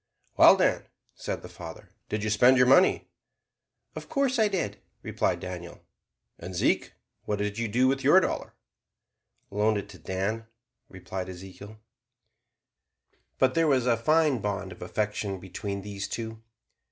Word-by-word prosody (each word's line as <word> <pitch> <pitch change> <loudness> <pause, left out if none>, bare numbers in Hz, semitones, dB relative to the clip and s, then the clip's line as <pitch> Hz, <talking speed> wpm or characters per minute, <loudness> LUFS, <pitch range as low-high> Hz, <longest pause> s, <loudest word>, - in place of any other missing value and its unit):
"Well, - - +8
Dan," - - +1 0.3
said - - -5
the - - -8
father, - - -11 0.2
"did 105 -1 -2
you 110 - -1
spend 125 +5 +5
your 125 - +6
money?" 135 +9 +4 0.9
"Of - - -8
course 275 -4 +1
I 220 - +5
did," 135 - -3 0.2
replied - - -1
Daniel. 90 -2 -8 0.6
"And, 90 +2 -7
Zeke, - - +1 0.3
what 105 - -1
did 105 +1 -3
you 115 - -1
do 125 +5 +2
with 135 +1 0
your 145 +8 +7
dollar?" - - -3 1.0
"Loaned 105 +1 +2
it 100 - -6
to 95 - -13
Dan," 95 +7 -3 0.4
replied 95 0 -6
Ezekiel. 95 +3 -10 1.6
But 130 -1 +3
there 165 -1 +2
was 130 -4 +2
a 120 -2 +3
fine 150 +2 +2
bond 100 -2 -3
of 90 - -12
affection 105 +1 -2
between 100 +2 -5
these 100 -1 -5
two. 110 +1 -6
105 Hz, 150 wpm, -27 LUFS, 95-130 Hz, 1.6 s, Well